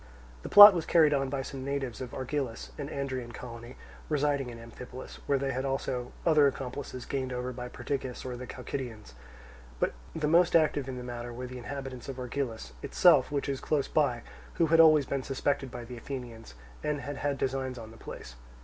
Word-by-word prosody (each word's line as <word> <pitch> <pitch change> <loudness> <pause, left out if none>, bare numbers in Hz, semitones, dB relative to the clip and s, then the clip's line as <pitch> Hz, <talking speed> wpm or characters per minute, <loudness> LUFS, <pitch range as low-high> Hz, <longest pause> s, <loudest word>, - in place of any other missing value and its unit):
The - - -7
plot 205 0 +12
was 170 -3 -2
carried 155 -3 +5
on 135 -1 0
by 135 0 -2
some 130 0 -7
natives 135 -4 -3
of 125 -2 -6
Argilus, 130 -2 -4
an 145 0 -4
Andrian 130 -4 -4
colony, 120 +1 -9 0.3
residing 145 -3 +1
in 120 - -8
Amphipolis, 125 +2 -10
where 140 - +3
they 135 0 -1
had 130 +1 -2
also 130 -2 -2
other 155 -4 +6
accomplices 130 -1 -5
gained 130 -2 -3
over 125 0 -3
by 125 0 -6
Perdiccas 130 0 -4
or 125 -1 -4
the 125 +1 -7
Chalcidians. 120 - -6 0.7
But - - +1 0.2
the 155 -2 0
most 170 +3 +4
active 150 -4 +3
in 130 - -5
the 125 - -6
matter 120 0 -6
were 125 +2 -6
the 125 0 -7
inhabitants 135 0 -6
of 135 - -4
Argilus 125 - -4
itself, - - +4
which 140 -1 -1
is 135 -1 -2
close 150 -3 0
by, 125 -6 +1 0.3
who 165 - +3
had 165 - +6
always 155 -3 +7
been 135 +1 -2
suspected 135 0 -1
by 120 0 -7
the 125 +1 -8
Athenians, 115 - -8 0.3
and 150 -1 -1
had 140 +1 -5
had 145 -1 -1
designs 130 -1 -2
on 110 -1 -9
the - - -13
place. - - -9
130 Hz, 195 wpm, -29 LUFS, 125-140 Hz, 0.7 s, plot